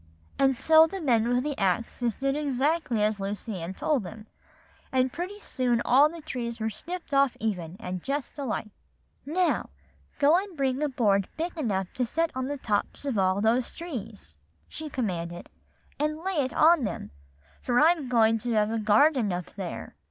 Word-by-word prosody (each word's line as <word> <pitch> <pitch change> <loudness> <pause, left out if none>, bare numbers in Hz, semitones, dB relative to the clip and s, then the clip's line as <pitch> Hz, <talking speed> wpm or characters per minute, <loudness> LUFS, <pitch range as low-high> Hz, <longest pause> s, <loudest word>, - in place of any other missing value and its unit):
"And 270 -2 +3
so 320 +3 +6
the 385 +4 -6
men 235 -8 +2
with 245 +1 +2
the 295 -1 -2
axes 230 +4 0
did 275 0 -1
exactly 285 -4 0
as 210 -1 +1
Lucy 200 0 -4
Ann 175 +3 -5
told 295 +2 +1
them; 210 +3 -9 0.7
and 255 -1 +1
pretty 365 +4 -5
soon 250 - 0
all 275 +5 +6
the 335 +1 -9
trees 235 -5 -5
were 220 0 -1
snipped 345 - -7
off 275 -2 +3
even, 185 -6 -3
and 180 -3 -5
just 280 - -4
alike. 230 -5 -3 0.6
"'Now 350 +4 +1 0.5
go 300 +5 +5
and 385 -4 -8
bring 270 0 0
a 300 - +1
board 200 -7 +2
big 335 +3 -3
enough 200 - -2
to 250 -2 -1
set 330 +6 0
on 260 0 -3
the 285 +1 -3
tops 215 +2 -2
of 255 -7 0
all 190 +1 +2
those 235 +3 +2
trees,' 225 - -8 0.3
she 310 -1 -7
commanded, 175 -10 -4 0.5
'and 305 +2 -1
lay 380 -2 -2
it 255 - -5
on 320 -2 +5
them, 205 - -4 0.5
for 245 -1 +2
I'm 310 -4 +3
going 225 -2 +4
to 240 +2 -2
have 210 0 +2
a 225 - -1
garden 220 +2 +4
up 175 0 -5
there. 190 -4 -6
250 Hz, 180 wpm, -27 LUFS, 210-300 Hz, 0.7 s, so